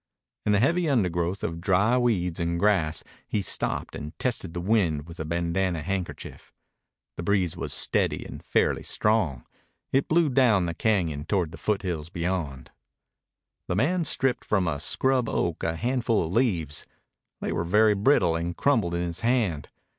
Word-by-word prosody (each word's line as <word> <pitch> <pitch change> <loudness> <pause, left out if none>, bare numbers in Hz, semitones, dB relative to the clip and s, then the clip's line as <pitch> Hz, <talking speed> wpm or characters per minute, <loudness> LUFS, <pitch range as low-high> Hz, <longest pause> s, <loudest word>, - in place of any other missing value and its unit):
In - - +4
the 100 - +4
heavy 170 +7 +2
undergrowth 90 -6 0
of 85 +1 -3
dry 100 +6 +3
weeds 95 -9 +1
and 85 0 -1
grass 85 -7 +2 0.2
he 105 - -1
stopped - - -1
and 75 +2 -7
tested 95 -9 -2
the - - -2
wind 85 -6 +1
with 85 0 -11
a 80 - -3
bandanna 85 +1 -1
handkerchief. 95 0 -5 0.7
The - - -3
breeze 90 -2 +1
was - - -4
steady - - 0
and - - -9
fairly - - +1
strong. 85 - 0 0.5
It 135 +1 +2
blew 165 -1 +3
down 120 -8 +4
the 85 - -2
cañon 85 -7 0
toward 90 -5 0
the - - -10
foothills 90 -7 -2
beyond. 85 -7 -3 1.0
The 90 - -1
man 170 - +1
stripped 135 -4 0
from 95 -4 +1
a 75 -3 -1
scrub 130 - +1
oak 85 -2 -1
a 80 - 0
handful 120 -1 0
of 80 - -5
leaves. 90 - 0 0.5
They - - -3
were 85 - -1
very 105 +5 +4
brittle 100 - +3
and 85 +1 -3
crumbled 110 -12 +2
in 85 - -1
his 85 0 -3
hand. 115 - 0
95 Hz, 165 wpm, -26 LUFS, 85-115 Hz, 1.0 s, In